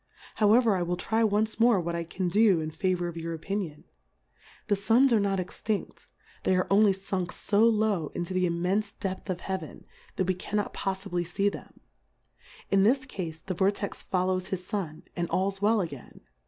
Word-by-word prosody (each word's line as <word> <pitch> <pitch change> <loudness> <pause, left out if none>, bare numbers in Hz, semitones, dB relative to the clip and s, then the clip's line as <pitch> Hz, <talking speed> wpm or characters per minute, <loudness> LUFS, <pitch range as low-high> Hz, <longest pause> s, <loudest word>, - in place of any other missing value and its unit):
How 210 -2 +4
ever, 230 -3 +5
I 180 - -1
will 175 0 -1
try 225 +5 0
once 215 +1 +1
more 230 -3 +5
what 170 0 -2
I 170 0 -2
can 180 +2 -3
do 200 -1 +4
in 155 0 -3
favour 180 +1 0
of 170 -1 -6
your 165 0 -4
Opinion: 165 -2 -4 0.8
The 205 - +3
Suns 235 +6 +4
are 225 - +5
not 200 -1 +1
extinft, 195 +3 -4 0.3
they 185 - +2
are 185 - +2
only 205 +1 +6
funk 190 -2 -3
fo 205 0 0
low 210 -7 +1
into 175 +2 -3
tlie 185 -1 +2
immenfe 190 +5 -1
depth 190 +1 -4
of 180 -1 -2
Heaven, 190 -5 -5 0.3
that 190 - 0
we 185 - +1
cannot 205 +3 -3
poffibly 190 -3 -3
fee 195 +3 +1
them; - - -11 0.9
in 195 - +5
this 260 +6 +3
Cafe 165 -9 -6
the 190 - -2
Vortex 200 +2 -1
follows 185 0 0
his 185 -2 -4
Sun 175 -6 -4
and 170 -1 -2
alPs 195 +1 0
well 215 +1 +3
again. 145 -8 -8
190 Hz, 185 wpm, -28 LUFS, 175-205 Hz, 0.9 s, only